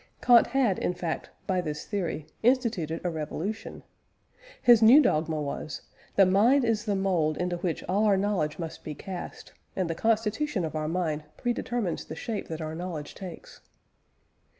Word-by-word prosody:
Kant 240 -2 +6
had, 240 -7 +1
in 180 - -1
fact, 170 -2 -4 0.2
by 185 -2 +1
this 150 -3 -5
theory, 175 -7 -3 0.2
instituted 220 - +1
a 175 - -1
revolution. 165 +7 -5 0.8
His 240 -2 +6
new 235 +6 +9
dogma 160 - +1
was: 145 0 -5 0.3
_The 195 -2 +7
mind 235 +8 +4
is 225 -1 0
the 205 -2 0
mould 180 -6 +1
into 180 0 -1
which 170 -2 -2
all 200 +4 +1
our 200 -2 +4
knowledge 190 -7 0
must 165 -2 -6
be 150 - -6
cast; 185 +4 -8 0.2
and 185 -2 0
the 165 - -1
constitution 220 - 0
of 155 -1 -5
our 155 0 -1
mind 160 -3 -1
predetermines 240 -5 -2
the 155 - -6
shape 215 +4 -4
that 160 0 -5
our 155 0 -4
knowledge 165 -3 -5
takes. 185 -3 -10
185 Hz, 165 wpm, -28 LUFS, 160-220 Hz, 0.8 s, new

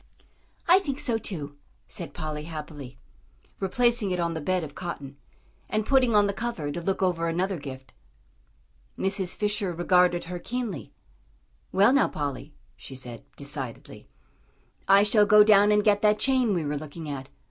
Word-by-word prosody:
"I 360 +2 +7
think 285 -7 -4
so 230 -3 0
too," 145 -9 -6 0.3
said - - -5
Polly, 155 -1 -5
happily, 150 - -8 0.6
replacing 235 +2 +1
it 180 -1 -1
on 170 -1 0
the 160 - -4
bed 185 +3 0
of 145 -2 -8
cotton, 145 -6 -7 0.5
and 215 0 -1
putting 255 -4 +3
on 205 -1 +5
the 200 - -1
cover 195 -9 -3
to 170 - -4
look 190 +2 -1
over 170 -2 +1
another 180 +2 -1
gift. 135 -2 -9 1.0
Mrs. 190 -1 -1
Fisher 205 -2 -1
regarded 175 +1 +2
her 180 +1 -6
keenly. 230 - -5 0.8
"Well, 200 +6 +5
now, 275 - +4
Polly," 145 0 -5 0.2
she 135 - -11
said, 125 -3 -8
decidedly, 140 -4 -6 0.8
"I 195 +1 +6
shall 210 0 +4
go 210 0 +8
down 205 -1 +5
and 210 0 +3
get 205 -1 +3
that 210 0 +4
chain 255 -4 +2
we 165 -3 -1
were 145 0 -2
looking 155 +2 -8
at. 135 -2 -6
180 Hz, 160 wpm, -26 LUFS, 150-210 Hz, 1.0 s, go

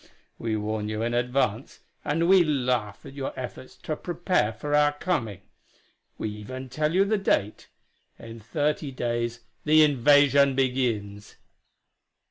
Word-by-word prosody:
We 115 -1 -2
warn 105 0 -3
you 110 +1 -3
in 120 +1 -1
advance, 125 -1 -1 0.2
and 165 +3 0
we 190 -1 +6
laugh 125 -8 -1
at - - -10
your 140 -1 -5
efforts 130 0 -8
to 155 - -2
prepare 175 - -1
for 145 +7 -5
our 145 0 +4
coming. 115 - -2 0.8
We - - -3
even 130 +5 -8
tell 150 +4 -1
you 195 +1 +4
the 215 +1 0
date: 105 - -1 0.5
in 115 0 -10
thirty 145 +5 -2
days 120 -2 -3 0.2
the 155 +1 +5
invasion 140 -1 +4
begins. 115 -6 -2
130 Hz, 135 wpm, -26 LUFS, 115-150 Hz, 0.8 s, we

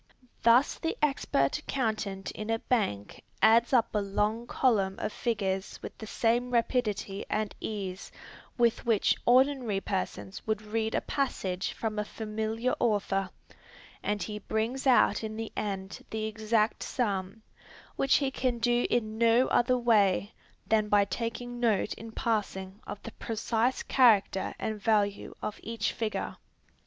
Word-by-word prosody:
Thus 240 +4 +4
the 325 - -2
expert 265 - +1
accountant 215 -7 -2
in 215 +1 -6
a 225 - +2
Bank 200 - -1 0.2
adds 230 +2 +5
up 240 -4 +3
a 210 - +1
long 210 +4 -1
column 200 -8 +2
of - - -3
figures 195 -5 -2
with - - -7
the 220 - -7
same 240 +3 +1
rapidity 230 -5 0
and 215 -1 -1
ease 195 -3 -5 0.5
with 235 -2 +2
which 225 -4 +3
ordinary 255 -4 +4
persons 190 0 -4
would 215 -1 -1
read 220 +1 -1
a - - +1
passage 190 -9 -2
from 215 -2 -3
a - - +1
familiar 220 +3 -2
author, 200 -4 +1 0.7
and 210 -1 -1
he 210 -1 -5
brings 230 +6 -2
out 250 -3 +4
in 215 0 -4
the 225 0 -4
end 195 -2 -4
the 220 0 -3
exact 220 0 0
sum, 205 -3 -2 0.5
which 270 - +3
he 275 -2 +2
can 255 -2 -1
do 240 +1 +2
in 220 -2 -1
no 235 +2 +5
other 250 +1 +3
way 210 -4 +3 0.3
than 215 -1 +2
by 205 -1 +5
taking 240 +4 -4
note 225 -4 +1
in 225 +1 -9
passing 205 -4 -2
of 205 - -6
the 230 - -7
precise 225 +3 -1
character 215 -7 +3
and 215 -1 -4
value 205 -2 +1
of 210 - -4
each 225 -2 -2
figure. 220 -2 -3
220 Hz, 145 wpm, -29 LUFS, 205-235 Hz, 0.7 s, adds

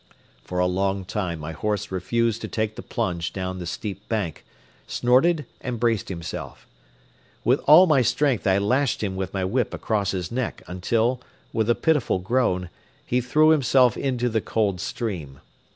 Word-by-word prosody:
For 90 - -5
a 90 - +3
long 95 +1 0
time 90 -3 -3
my 75 +1 -6
horse 105 +3 -2
refused 115 +5 0
to - - -4
take 110 -1 -2
the - - -7
plunge 90 -7 -2
down 95 -1 -4
the 90 - -5
steep 100 +3 -6
bank, 105 -8 -2 0.4
snorted 145 +6 +3 0.2
and 125 -3 -4
braced 115 -3 +1
himself. 85 -3 -6 0.8
With - - +3
all 155 +6 +9
my 150 -6 +4
strength 130 -2 +1
I 95 0 +4
lashed 125 +5 +1
him 95 -2 -2
with 95 0 -3
my 95 -1 -1
whip 115 +5 0
across 105 -3 -1
his 90 -2 -3
neck 125 -1 -3
until, 115 +7 0 0.3
with 110 -1 0
a 120 - +4
pitiful 155 - +1
groan, 90 -3 0 0.3
he 125 +1 +1
threw 155 +6 +4
himself 130 -5 +4
into 125 -3 -1
the 110 -2 0
cold 100 -5 0
stream. 80 - -4
110 Hz, 170 wpm, -24 LUFS, 95-125 Hz, 0.8 s, all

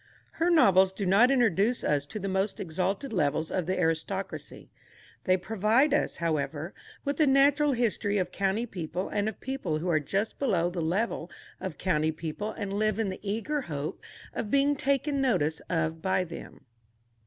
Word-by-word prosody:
Her 335 +2 0
novels 190 - +5
do 195 +1 -4
not 200 +7 +5
introduce 235 -3 +2
us 145 -1 +1
to 215 - -6
the 195 -1 -3
most 190 +1 -1
exalted 190 - -2
levels 155 -3 0
of 180 -3 -1
the 185 - 0
aristocracy. 180 +4 -3 0.5
They 185 -1 +4
provide 220 +9 +2
us, 295 - +1
however, 155 0 -2 0.3
with 285 +2 -2
a 305 - +5
natural 280 +2 +4
history 210 -4 0
of 180 -2 -1
county 195 +5 0
people 185 -2 -4
and 205 +1 0
of 220 - -9
people 260 -13 -2
who 175 +4 -3
are 160 -2 +3
just 195 +9 -2
below 180 -10 +1
the 175 -1 -3
level 175 +1 -1 0.3
of 180 -6 -5
county 160 -4 +1
people 160 +6 -5
and 200 -2 -5
live 215 0 +1
in 220 -3 0
the 185 - -6
eager 225 +9 -2
hope 150 - -5 0.3
of 210 - -3
being 280 +2 +3
taken 280 +1 0
notice 160 - +1
of 160 -1 -1
by 185 0 +1
them. 165 -4 -10
195 Hz, 175 wpm, -28 LUFS, 170-235 Hz, 0.5 s, novels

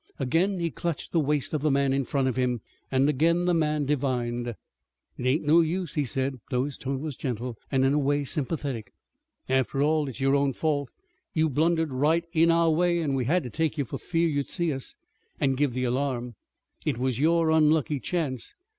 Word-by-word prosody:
Again 170 +9 +1
he 170 -1 -1
clutched 170 -1 -4
the 170 - +2
waist 150 -1 +1
of 155 - 0
the 155 - +2
man 140 -1 +2
in 135 -1 0
front 135 +1 0
of 130 - -1
him 125 -3 0 0.3
and 135 +1 +3
again 165 +5 +2
the 180 - +2
man 150 -3 +1
divined. 125 -4 -1
"It 120 +1 -11
ain't 150 +5 +1
no 155 +3 +6
use," 170 0 -2
he 150 - 0
said, 130 +1 -2
although 125 0 +1
his 145 -2 -6
tone 135 0 -3
was 155 -3 -4
gentle, 125 -2 -4 0.2
and 135 -1 +3
in 135 - +3
a 150 - +3
way 145 +1 +1
sympathetic. 140 - -2 0.6
"After 130 +1 +1
all, 150 -1 +2
it's 130 - -8
your 135 0 +2
own 140 -1 +2
fault. 145 -3 -1 0.5
You 160 0 +3
blundered 160 +1 +1
right 155 +6 +2
in 165 0 +4
our 165 -1 +4
way, 175 +2 +2
an' 150 -4 -1
we 130 -2 0
had 175 +7 +2
to 125 - -7
take 160 +2 -1
you 140 - 0
for - - -6
fear 170 -1 0
you'd 145 -3 -1
see 170 -4 0
us, 135 -1 -7 0.4
an' 135 -1 +2
give 135 -1 0
the 130 - -1
alarm. 125 -1 -1 0.5
It 145 -6 -1
was 130 -1 -1
your 165 +1 +3
unlucky 155 -2 +3
chance. 140 -7 -3
145 Hz, 210 wpm, -27 LUFS, 130-160 Hz, 0.6 s, no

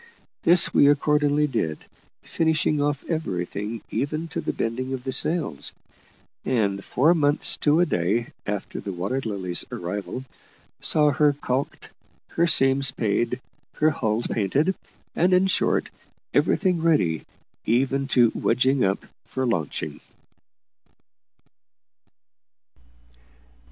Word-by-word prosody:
This 175 +1 +6
we 140 - +5
accordingly 150 0 +2
did, 95 - -2 0.5
finishing 155 -2 0
off 145 -1 -1
everything, 105 - -4
even 155 +4 -2
to - - -4
the - - -2
bending 130 +3 -3
of 130 -2 -5
the 130 - -3
sails; 150 - +1 0.7
and 100 -6 -1
four 155 +7 +2
months 145 -3 +3
to 150 +2 +2
a 175 - +4
day 115 - -1 0.2
after 105 -1 -4
the 100 - -6
Water 100 +10 -3
Lily's 95 -5 -1
arrival 100 +8 -5 0.6
saw 150 -1 +3
her 145 +1 +3
caulked, 135 -1 -4 0.4
her 170 - +1
seams 135 -4 +5
paid, 120 +1 -1 0.4
her 155 +1 +2
hull 110 -4 -1
painted, 135 - 0 0.4
and, 180 +3 +2
in 185 +1 +3
short, 190 - 0 0.4
everything 180 -4 +1
ready, 145 - +1 0.4
even 135 +4 +1
to 120 -4 +3
wedging 130 +1 +1
up, 95 0 -1 0.2
for 130 0 -3
launching. 90 - -3
135 Hz, 115 wpm, -24 LUFS, 110-150 Hz, 0.7 s, This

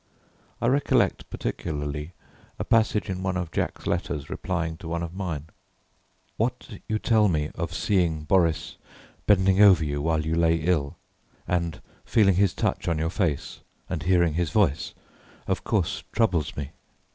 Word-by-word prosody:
I - - -2
recollect 135 +4 +2
particularly 75 +3 -4 0.4
a - - -2
passage 110 -2 +2
in 95 -2 -3
one 95 -1 -1
of 85 -3 -3
Jack's - - -3
letters 70 -2 -2
replying 80 -3 -2
to 85 - -9
one 85 +1 -2
of 85 0 -6
mine 85 -6 -4 0.9
"What 115 -2 -3
you 110 - +1
tell 110 -1 +3
me 75 -4 0
of 85 0 -4
seeing 85 -3 +1
Boris 85 0 +1 0.5
bending 95 -1 +4
over 95 -6 +7
you 70 -1 -2
while 80 0 0
you 80 - -1
lay 85 0 +3
ill, 75 -4 0 0.5
and 85 -2 -1 0.2
feeling 95 -5 +3
his 100 -2 +3
touch - - -1
on 85 -2 +1
your 80 +1 -1
face, 85 -7 -1 0.3
and 85 -4 -3
hearing 85 -2 +3
his 85 0 0
voice, 85 -5 +1 0.5
of - - -1
course - - 0
troubles 90 -10 +1
me. 70 0 -4
85 Hz, 155 wpm, -26 LUFS, 80-95 Hz, 0.9 s, over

